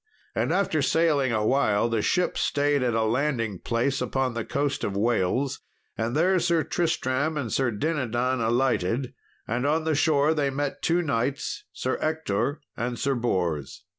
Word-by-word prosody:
And -, -, 0 dB
after 170 Hz, -6 st, +1 dB
sailing 145 Hz, -3 st, +2 dB
awhile 110 Hz, -1 st, +2 dB
the 115 Hz, -2 st, 0 dB
ship 180 Hz, -, +1 dB
stayed 145 Hz, -1 st, +1 dB
at 120 Hz, -2 st, +1 dB
a 115 Hz, -, +2 dB
landing 115 Hz, -, 0 dB
place 125 Hz, +3 st, 0 dB
upon 130 Hz, -2 st, -1 dB
the 115 Hz, -1 st, -3 dB
coast 140 Hz, +2 st, -1 dB
of 100 Hz, -1 st, -2 dB
Wales; 120 Hz, +4 st, +1 dB, 0.4 s
and 115 Hz, +3 st, -2 dB
there 180 Hz, +4 st, +3 dB
Sir 170 Hz, -2 st, +2 dB
Tristram 155 Hz, -2 st, 0 dB
and 125 Hz, -7 st, -3 dB
Sir 130 Hz, -2 st, +2 dB
Dinadan 125 Hz, -1 st, -1 dB
alighted, 120 Hz, 0 st, +1 dB, 0.3 s
and 120 Hz, +3 st, -1 dB
on 155 Hz, +2 st, +1 dB
the 160 Hz, 0 st, +1 dB
shore 150 Hz, 0 st, +3 dB
they 145 Hz, -3 st, +1 dB
met 140 Hz, +1 st, -3 dB
two 175 Hz, +1 st, +2 dB
knights, 135 Hz, -1 st, -2 dB
Sir 130 Hz, -, -2 dB
Ector 145 Hz, -3 st, -1 dB
and 120 Hz, 0 st, -3 dB
Sir 140 Hz, -, 0 dB
Bors. 90 Hz, -, -2 dB
130 Hz, 160 wpm, -26 LUFS, 115-150 Hz, 0.4 s, there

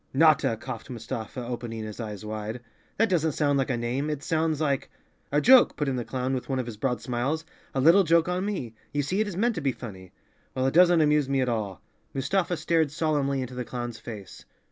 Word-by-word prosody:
"Notta!" 150 Hz, -6 st, +4 dB
coughed 110 Hz, 0 st, -7 dB
Mustafa, 120 Hz, 0 st, -5 dB
opening 120 Hz, -2 st, -5 dB
his 110 Hz, +1 st, -7 dB
eyes 105 Hz, -2 st, -6 dB
wide. 110 Hz, +2 st, -5 dB, 0.4 s
"That 225 Hz, -, +4 dB
doesn't 160 Hz, -6 st, +1 dB
sound 145 Hz, -1 st, +2 dB
like 135 Hz, -, 0 dB
a 125 Hz, -, 0 dB
name. 125 Hz, +5 st, -1 dB
It 150 Hz, -2 st, -3 dB
sounds 160 Hz, -2 st, 0 dB
like—" 140 Hz, -4 st, 0 dB, 0.4 s
"A 145 Hz, -, +3 dB
joke," 255 Hz, -, +7 dB
put 150 Hz, -, -1 dB
in 135 Hz, -, 0 dB
the 125 Hz, -, -2 dB
clown, 130 Hz, +2 st, -2 dB
with 130 Hz, +1 st, -3 dB
one 135 Hz, -, 0 dB
of 130 Hz, -, -1 dB
his 115 Hz, -2 st, -6 dB
broad 125 Hz, +3 st, -1 dB
smiles, 135 Hz, +6 st, -2 dB, 0.3 s
"a -, -, +1 dB
little 165 Hz, +8 st, +6 dB
joke 165 Hz, 0 st, +3 dB
on 180 Hz, +1 st, -1 dB
me. 185 Hz, -, -3 dB, 0.2 s
You 145 Hz, 0 st, 0 dB
see 185 Hz, +8 st, -1 dB
it 215 Hz, -, 0 dB
is 185 Hz, -4 st, -5 dB
meant 235 Hz, +4 st, +2 dB
to 165 Hz, -, -4 dB
be 135 Hz, -2 st, +1 dB
funny." 95 Hz, -7 st, -9 dB, 0.4 s
"Well, 130 Hz, -, 0 dB
it 135 Hz, -, +1 dB
doesn't 175 Hz, -1 st, +6 dB
amuse 150 Hz, -2 st, +3 dB
me 135 Hz, -1 st, +1 dB
at 125 Hz, -, +1 dB
all." 105 Hz, -5 st, -3 dB, 0.3 s
Mustafa 175 Hz, +6 st, 0 dB
stared 160 Hz, -2 st, +2 dB
solemnly 145 Hz, -3 st, 0 dB
into 130 Hz, 0 st, -5 dB
the 125 Hz, 0 st, -3 dB
clown's 120 Hz, -1 st, -5 dB
face. 105 Hz, -5 st, -9 dB
135 Hz, 225 wpm, -27 LUFS, 120-160 Hz, 0.4 s, joke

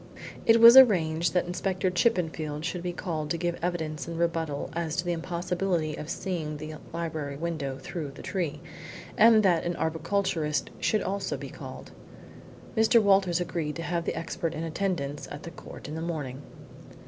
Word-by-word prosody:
It 230 Hz, 0 st, +7 dB
was 230 Hz, +2 st, +10 dB
arranged 170 Hz, -10 st, +6 dB
that 180 Hz, -, +3 dB
Inspector 185 Hz, +1 st, -1 dB
Chippenfield 160 Hz, -7 st, 0 dB
should 180 Hz, 0 st, -3 dB
be 175 Hz, 0 st, -2 dB
called 160 Hz, -4 st, -4 dB
to 170 Hz, -, 0 dB
give 175 Hz, 0 st, -2 dB
evidence 160 Hz, -3 st, -2 dB
in 165 Hz, -1 st, -5 dB
rebuttal 165 Hz, -4 st, -1 dB
as 165 Hz, -2 st, -2 dB
to 175 Hz, -, -1 dB
the 175 Hz, -, 0 dB
impossibility 175 Hz, -1 st, -1 dB
of 150 Hz, -, -7 dB
seeing 160 Hz, -6 st, -3 dB
the 155 Hz, +1 st, -7 dB
library 160 Hz, -4 st, -4 dB
window 145 Hz, -4 st, -3 dB
through 155 Hz, +1 st, -5 dB
the -, -, -10 dB
tree, 175 Hz, -6 st, -3 dB, 0.5 s
and 220 Hz, -1 st, +6 dB
that 175 Hz, -4 st, +3 dB
an 175 Hz, 0 st, -2 dB
arboriculturist 160 Hz, 0 st, -1 dB
should 215 Hz, -, +1 dB
also 195 Hz, +1 st, -2 dB
be -, -, -7 dB
called. -, -, -9 dB, 0.8 s
Mr. 220 Hz, +1 st, +5 dB
Walters 195 Hz, -4 st, +3 dB
agreed 165 Hz, -4 st, -2 dB
to 165 Hz, -, -5 dB
have 170 Hz, -1 st, -2 dB
the -, -, -2 dB
expert 165 Hz, 0 st, -3 dB
in 160 Hz, -, -3 dB
attendance 165 Hz, -4 st, -2 dB
at 145 Hz, -, -8 dB
the 170 Hz, -, -7 dB
court 165 Hz, -, -10 dB
in 150 Hz, -, -6 dB
the 160 Hz, -, -4 dB
morning. 145 Hz, -6 st, -4 dB
170 Hz, 170 wpm, -28 LUFS, 155-185 Hz, 0.8 s, was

